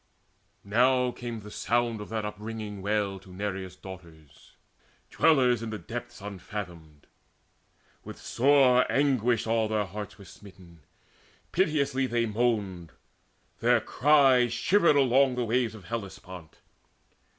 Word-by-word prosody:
Now 125 Hz, +4 st, +2 dB
came 120 Hz, -2 st, -7 dB
the 105 Hz, +1 st, -11 dB
sound 120 Hz, -1 st, -1 dB
of 105 Hz, -, -9 dB
that 110 Hz, -1 st, -3 dB
upringing 105 Hz, -1 st, -6 dB
wail 100 Hz, -1 st, -1 dB
To 95 Hz, 0 st, -16 dB
Nereus' 95 Hz, -1 st, -5 dB
Daughters, 85 Hz, -6 st, -14 dB, 0.6 s
dwellers 125 Hz, -6 st, +3 dB
in 115 Hz, -, -5 dB
the 110 Hz, -, -4 dB
depths 120 Hz, 0 st, -8 dB
Unfathomed. 90 Hz, -6 st, -8 dB, 1.0 s
With -, -, -9 dB
sore 130 Hz, -1 st, +3 dB
anguish 125 Hz, -5 st, +2 dB
all 110 Hz, -1 st, +1 dB
their 105 Hz, -1 st, 0 dB
hearts 105 Hz, +2 st, -8 dB
Were 100 Hz, -, -13 dB
smitten: 90 Hz, -3 st, -15 dB, 0.7 s
piteously 140 Hz, -7 st, +1 dB
they 120 Hz, -1 st, 0 dB
moaned: 105 Hz, -7 st, -1 dB, 0.7 s
their -, -, +4 dB
cry 135 Hz, -4 st, +4 dB
Shivered 170 Hz, -, +3 dB
along 135 Hz, -1 st, +4 dB
the 125 Hz, -1 st, -1 dB
waves 115 Hz, 0 st, 0 dB
of 100 Hz, -5 st, -13 dB
Hellespont. 95 Hz, -6 st, -8 dB
110 Hz, 120 wpm, -27 LUFS, 100-125 Hz, 1.0 s, their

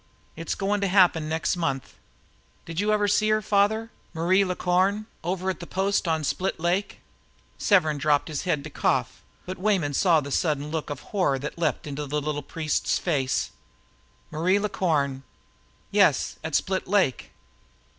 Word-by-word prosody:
It's 165 Hz, 0 st, -3 dB
goin' 200 Hz, +1 st, -1 dB
to 200 Hz, -, +1 dB
happen 180 Hz, -5 st, +4 dB
next 160 Hz, +3 st, 0 dB
month. 140 Hz, -7 st, -2 dB, 0.7 s
Did 165 Hz, +1 st, -5 dB
you 210 Hz, +1 st, +1 dB
ever 210 Hz, -1 st, +2 dB
see 215 Hz, +1 st, +2 dB
her, 215 Hz, 0 st, +3 dB
father 215 Hz, +2 st, +1 dB, 0.2 s
Marie 180 Hz, +4 st, +3 dB
La 185 Hz, -1 st, -2 dB
Corne, 190 Hz, +4 st, +1 dB, 0.2 s
over 185 Hz, +2 st, -2 dB
at 180 Hz, -, -8 dB
the 175 Hz, -, -8 dB
post 195 Hz, 0 st, 0 dB
on 160 Hz, -1 st, 0 dB
Split 185 Hz, +6 st, -1 dB
Lake?" 180 Hz, +4 st, -1 dB, 0.6 s
Severn 155 Hz, -8 st, +3 dB
dropped 145 Hz, 0 st, +2 dB
his 155 Hz, -3 st, -3 dB
head 150 Hz, -6 st, -1 dB
to 155 Hz, -, -8 dB
cough, -, -, 0 dB, 0.2 s
but 185 Hz, 0 st, -6 dB
Weyman 185 Hz, -8 st, +1 dB
say 165 Hz, +2 st, +4 dB
the 140 Hz, 0 st, -7 dB
sudden 150 Hz, -1 st, 0 dB
look 160 Hz, -2 st, -3 dB
of 145 Hz, -2 st, -5 dB
horror 180 Hz, -9 st, +2 dB
that 150 Hz, +5 st, -6 dB
leaped 160 Hz, 0 st, 0 dB
into 145 Hz, 0 st, -5 dB
the 150 Hz, +2 st, -1 dB
little 150 Hz, 0 st, -3 dB
priest's 155 Hz, +1 st, -1 dB
face. 140 Hz, -7 st, -1 dB, 0.8 s
"Marie 175 Hz, +6 st, +2 dB
La 210 Hz, +1 st, -1 dB
Corne!" 140 Hz, -8 st, 0 dB, 0.7 s
"Yes, 195 Hz, -9 st, +3 dB
at 160 Hz, -1 st, -2 dB
Split 190 Hz, 0 st, 0 dB
Lake." 190 Hz, -10 st, +1 dB
170 Hz, 165 wpm, -25 LUFS, 150-195 Hz, 0.8 s, happen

